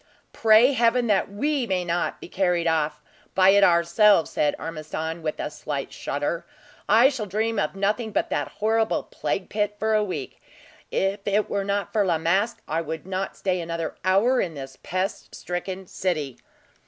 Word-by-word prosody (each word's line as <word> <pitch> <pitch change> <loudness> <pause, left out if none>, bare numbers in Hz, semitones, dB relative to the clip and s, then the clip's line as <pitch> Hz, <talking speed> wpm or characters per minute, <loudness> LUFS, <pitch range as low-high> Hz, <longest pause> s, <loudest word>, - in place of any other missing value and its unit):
"Pray 225 +4 +5
Heaven 240 0 +3
that 205 -4 +2
we 265 +5 -1
may 185 -3 0
not 175 0 -1
be - - -9
carried 180 -2 0
off 155 -2 0 0.3
by 190 +1 +6
it 200 +1 +6
ourselves!" 170 +2 +4
said 150 - +1
Ormiston, 160 +1 -5
with 155 -1 -3
a - - -3
slight 145 -2 -5
shudder. 145 +4 -3 0.5
"I 235 +4 +7
shall 230 -7 -4
dream 220 +3 -1
of 200 - -1
nothing 210 +3 -1
but - - -1
that - - 0
horrible 220 +1 0
plague 190 - -3
pit 210 0 -1
for 220 +1 0
a 215 -1 +3
week. 190 -3 -5 0.5
If 195 +2 0
it 205 +1 +1
were 200 -1 0
not 200 0 -2
for 215 -2 +3
La 175 -4 +1
Masque, 190 +8 0
I 160 +2 -1
would 160 +1 -6
not 190 0 -4
stay 185 -2 -1
another 165 -1 -3
hour 200 +8 +3
in 165 -4 -3
this 135 -1 -8
pest 185 +3 -3
stricken 185 +2 -5
city." 155 -8 -3
190 Hz, 175 wpm, -24 LUFS, 165-210 Hz, 0.5 s, I